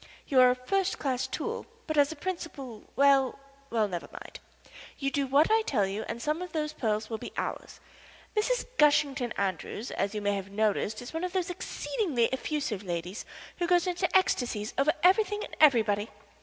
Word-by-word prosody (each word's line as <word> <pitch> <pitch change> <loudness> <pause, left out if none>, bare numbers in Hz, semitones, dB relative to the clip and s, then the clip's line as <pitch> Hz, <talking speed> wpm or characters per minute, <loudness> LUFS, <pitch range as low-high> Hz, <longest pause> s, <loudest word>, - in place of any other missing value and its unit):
You 270 -4 +4
are 250 - +8
a 250 - +2
first 385 +10 0
class 265 -2 -1
tool, - - -4 0.2
but 310 - -2
as 290 0 +4
a - - -6
principal 290 - -6
well 275 -2 +4 0.3
well, 220 -2 +1
never 175 -3 -5
mind. - - -10 0.6
You 275 -1 -1
do 280 -1 0
what 285 +8 +4
I 445 0 +5
tell 235 - +1
you 200 +3 -4
and 230 - -4
some 300 +6 -1
of 360 0 -6
those 305 -1 -1
pearls 215 -5 -1
will 225 -1 -4
be - - -7
ours. - - -4 0.6
Mrs. - - +1
Gushington 285 -4 +3
Andrews, 200 +4 -3
as 200 +2 -2
you 210 - -2
may 205 0 +2
have 195 0 -5
noticed, 215 +2 0
is 245 - -9
one 325 +2 -3
of 365 0 -3
those 360 -2 -1
exceedingly 345 - -1
effusive 265 -6 -2
ladies 175 +1 -4 0.3
who 345 - +1
go 355 - +5
into 355 0 +1
ecstasies 240 - 0
over 275 +3 +3
everything 415 +3 +4
and - - -8
everybody. 220 -8 +4
270 Hz, 185 wpm, -29 LUFS, 215-335 Hz, 0.6 s, are